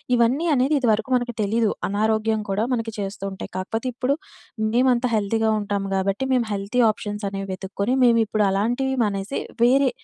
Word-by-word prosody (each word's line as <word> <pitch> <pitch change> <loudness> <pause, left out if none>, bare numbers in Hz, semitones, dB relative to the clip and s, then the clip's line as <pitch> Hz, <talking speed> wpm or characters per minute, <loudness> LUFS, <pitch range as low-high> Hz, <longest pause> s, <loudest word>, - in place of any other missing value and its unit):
ఇవన్నీ 250 +8 +2
అనేది 265 +4 +2
ఇదివరకు 225 -2 +1
మనకు 245 -1 -1
తెలీదు. 220 +1 +1 0.2
అనారోగ్యం 220 +1 +1
కూడా 205 +3 0
మనకి 225 -2 -2
చేస్తూ 195 0 -5
ఉంటాయి. 190 - -8
కాకపోతే 225 +6 -3
ఇప్పుడు, 255 +3 0 0.6
మేమంతా 250 0 +3
హెల్దీగా 220 +1 +1
ఉంటాం 200 -1 -2
గాబట్టి, 195 +6 0
మేం 245 -2 +2
హెల్తీ 200 +5 0
ఆప్షన్సనేవి 200 -2 -5
వెతుక్కొని, 200 +5 -2
మేమిప్పుడు 225 -3 +3
అలాంటివి 245 +7 0
మానేసి, 200 +4 -3 0.2
వేరే 265 +3 +5
220 Hz, 145 wpm, -23 LUFS, 200-245 Hz, 0.6 s, వేరే